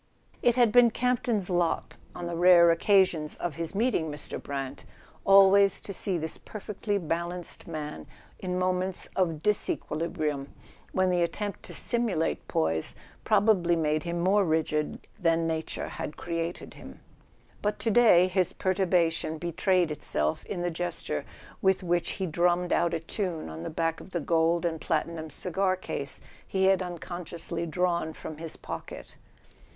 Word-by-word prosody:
It 240 -1 +4
had 240 -3 +4
been 245 +1 +7
Campton's 240 -4 0
lot, 175 -2 0 0.2
on 175 - -5
the 170 0 -3
rare 170 -1 +7
occasions 170 -3 +3
of 170 -4 -4
his 165 +3 -4
meeting 205 -8 +1
Mr. 145 0 -6
Brant, 135 -1 -5 0.4
always 195 0 +6
to 200 - -7
see 190 -1 -1
this 160 0 -4
perfectly 210 0 -4
balanced 170 0 -3
man 150 - -6 0.3
in 180 -1 -2
moments 185 0 -1
of 165 -4 0
disequilibrium, 155 -7 -1 0.4
when 185 -1 +2
the 175 -1 +2
attempt 205 +4 -2
to - - -8
simulate 230 -9 -1
poise 80 0 0 0.3
probably 200 -5 +3
made 155 -1 +1
him 170 +1 -3
more 195 +4 +3
rigid 155 -2 -1
than 165 -1 +2
nature 160 -1 -3
had 150 - -6
created 170 0 -4
him. - - -12 0.6
But 210 0 0
to 225 - 0
day 210 -6 +6
his 185 -1 +1
perturbation 175 -4 +1
betrayed 175 +1 +1
itself 75 - -1
in 180 -3 -3
the 175 - 0
gesture 165 - -3 0.4
with 190 0 +2
which 175 -1 0
he 190 - -2
dru 170 +1 +2
mm 175 0 +2
ed 175 - -1
out 170 0 +2
a - - -1
tune 165 - -4
on 80 +1 -7
the - - -4
back 165 0 -1
of - - -12
the 175 - -2
gold 165 +1 +2
and 160 -2 -2
platinum 160 0 -2
cigar 185 +5 0
case 140 -7 -4 0.3
he 190 0 +1
had 190 -1 +4
unconsciously 170 -1 -5
drawn 170 -1 0
from 155 0 -8
his 165 0 -5
pocket. - - -8
175 Hz, 155 wpm, -28 LUFS, 160-190 Hz, 0.6 s, been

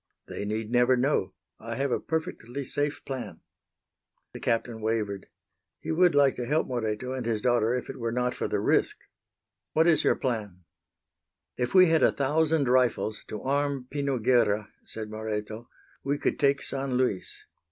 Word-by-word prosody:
"They 100 - -5
need 110 +1 -3
never 125 +1 +4
know. 125 -8 0 0.2
I - - -6
have 135 -1 -1
a - - +1
perfectly 140 -5 -4
safe 145 +3 -2
plan." 130 -2 -6 0.9
The - - -7
Captain 115 -1 -1
wavered. 110 -3 -2 0.5
He 160 - -4
would 175 0 +4
like 140 -2 +5
to 120 - -3
help 155 +4 +2
Moreto 120 0 -3
and 130 -1 -3
his 115 -2 0
daughter 120 0 +2
if 125 - -4
it - - -8
were 115 -1 -2
not 125 +1 0
for - - -3
the - - -1
risk. - - +2 0.8
"What 160 +1 +4
is 160 -3 +4
your - - +3
plan?" 105 -8 -3 0.9
"If 125 +8 -2
we 185 -1 +9
had 160 -2 +3
a - - +5
thousand 150 +1 +1
rifles 120 -4 +1
to 105 - -6
arm 140 -1 0
Pino 140 -2 -1
Guerra," 110 -3 +2 0.2
said 110 -1 -6
Moreto, 110 +1 -5 0.3
"we 140 +1 0
could - - -1
take 140 0 +2
San 135 -1 -3
Luis. 125 -7 -1
125 Hz, 170 wpm, -27 LUFS, 110-140 Hz, 0.9 s, we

